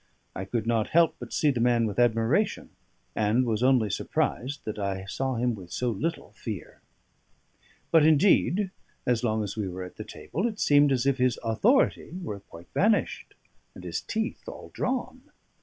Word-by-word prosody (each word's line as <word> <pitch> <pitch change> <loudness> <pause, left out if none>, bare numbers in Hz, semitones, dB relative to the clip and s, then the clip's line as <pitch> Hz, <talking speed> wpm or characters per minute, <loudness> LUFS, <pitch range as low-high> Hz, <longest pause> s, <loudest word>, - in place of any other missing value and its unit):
I 95 - -4
could 110 +2 -2
not 115 -2 +1
help 170 -2 +5
but - - -8
see 150 - +2
the 125 - -2
man 120 -1 +3
with 105 +1 -3
admiration, 120 - +1 0.4
and 110 +4 +2
was 110 -2 -1
only 125 -5 +3
surprised 135 +8 -2
that 110 -1 -4
I 95 -1 -3
saw 130 +6 -2
him 120 +1 +1
with 90 -5 -10
so 125 -1 -1
little 160 - -3
fear. 105 -6 -7 1.1
But 165 -2 +6
indeed 185 +5 +4 0.3
(as 125 -1 +1
long 110 -2 +1
as 100 - -5
we 105 -3 -2
were 90 0 -5
at 90 - -10
the - - -5
table) 190 +9 -3
it 215 -3 -6
seemed 145 0 +5
as 130 -1 +1
if 140 -1 +2
his 125 -1 +2
authority 175 - +2
were 105 -11 -5
quite 85 -3 -14
vanished 210 +1 +1 0.4
and - - -11
his - - -3
teeth 220 +1 -4
all - - -10
drawn. 255 0 -2
120 Hz, 175 wpm, -27 LUFS, 110-155 Hz, 1.1 s, But